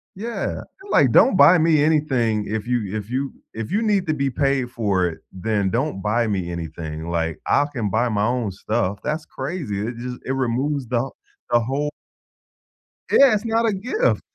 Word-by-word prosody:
Yeah, 230 +4 -3 0.3
like, 130 - +4
"Don't 235 - +6
buy 180 -1 +7
me 155 -2 +4
anything 130 -9 +1
if 110 +1 -3
you 110 -5 -1
if 105 +1 -5
you 135 +2 -2 0.2
if 115 +5 -5
you 210 +3 +1
need 205 -5 +1
to 155 - +2
be 140 -2 0
paid 135 -2 0
for 100 -7 +1
it, 80 - -6
then 100 0 -1
don't 120 -2 -1
buy 115 +3 +1
me 95 -4 -2
anything." 80 -1 -6
Like, 80 -2 -1
"I 145 - +3
can 110 -7 -2
buy 120 +5 +1
my 105 -1 +1
own 120 -3 0
stuff." 105 +1 -2
That's 155 +2 -2
crazy. 135 - -4
It 120 - -5
just, 125 +1 -5
it 130 - -2
removes 135 +1 -1
the 125 +2 0 0.4
the 120 - +5
whole 135 +5 -1 1.2
Yeah, 275 -4 +7
it's 210 +2 -1
not 230 +1 +1
a 215 - +2
gift. 255 - 0
125 Hz, 185 wpm, -22 LUFS, 105-150 Hz, 1.2 s, buy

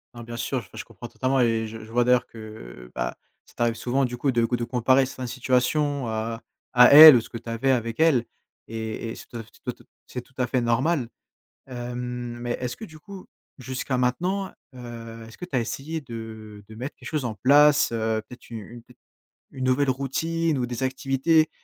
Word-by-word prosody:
Non 120 - -8
bien 120 0 -7
sûr, 130 +2 -2
et - - -10
je - - -5
comprends - - -10
totalement 130 +1 0
et 115 -2 +2
je 110 0 -9
je 110 - -13
vois 120 +1 +3
d'ailleurs 125 0 +3
que, - - -15
heu, 60 - -11
bah, - - -3 0.3
ça - - -21
t'arrive 120 -1 +1
souvent 130 +4 0
du 125 -1 -4
coup 135 +3 0
de 120 -2 +2
gou 120 - 0
de 120 - -3
comparer 125 +2 +3
certaine 130 -1 -6
situation 130 +2 0
à 115 +1 -3 0.3
à 125 0 +8
elle, 155 -1 +13
ou 120 - +3
ce - - -13
que 115 - -6
tu 115 - -10
avais 115 +4 +1
avec 115 -1 -1
elle 150 -7 +4 0.4
et 110 0 -5
et - - -6
c - - -11
ce 120 - -5 0.3
t - - -13
te - - -21 0.2
c'est 125 - -6
tout 125 - -25
à 125 - +1
fait 130 0 0
normal! 125 +3 +1 0.6
Hem, 125 -1 -5
mais 120 0 -3
est-ce 125 -1 -4
que 220 - -7
du 160 -6 -14
coup 195 +4 -11 0.3
jusqu'à 130 0 -3
maintenant, 180 +11 0 0.2
heu, 115 -2 -9
est-ce 115 - -14
que - - -10
tu 180 - -24
as - - +3
essayé 140 +7 -4
de 110 -5 -9
de 110 - -12
mettre 130 +6 -6
des - - -16
choses 150 -5 -2
en 110 -3 -3
place, 145 +6 +5
heu, 110 -1 -1
peut-être 125 - -13
u - - -6
une 115 +2 -9 0.7
une 130 - -6
nouvelle 130 +2 +2
routine? 155 +4 -1
Ou 125 - -1
des 120 +1 -4
activités, 135 +4 +2
125 Hz, 215 wpm, -25 LUFS, 115-135 Hz, 0.7 s, elle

